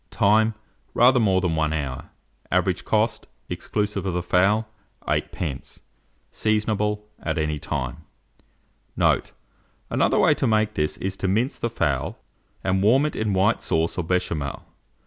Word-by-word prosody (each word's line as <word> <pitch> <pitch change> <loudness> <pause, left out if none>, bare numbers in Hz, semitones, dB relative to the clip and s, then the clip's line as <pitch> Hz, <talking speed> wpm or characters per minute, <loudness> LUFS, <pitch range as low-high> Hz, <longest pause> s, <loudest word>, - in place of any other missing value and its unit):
Time. 110 +2 +3 0.4
Rather 125 +2 +6
more 95 -5 +3
than 85 -3 0
1 80 -1 +1
hour. 70 -5 -4 0.4
Average - - +1
cost, - - 0 0.2
exclusive 105 -2 -2
of 95 -2 -2
the 90 - -1
fowl, 100 +5 +2 0.4
8d. 70 -6 -3 0.5
Seasonable 105 -1 0 0.2
at 80 0 -2
any 75 -1 -1
time. 65 -4 -3 1.0
Note. - - +2 0.6
Another - - +2
way - - +5
to - - 0
make 110 -1 +2
this 75 -4 -1
is 95 0 -3
to 95 - -2
mince 110 +8 0
the 120 - -1
fowl, 75 - -1 0.5
and 95 0 +1
warm 125 +8 +4
it 150 - -2
in 110 -2 -1
white 95 +4 +2
sauce 80 +1 0
or 90 - -1
Béchamel. 80 -5 -2
95 Hz, 145 wpm, -24 LUFS, 80-110 Hz, 1.0 s, Rather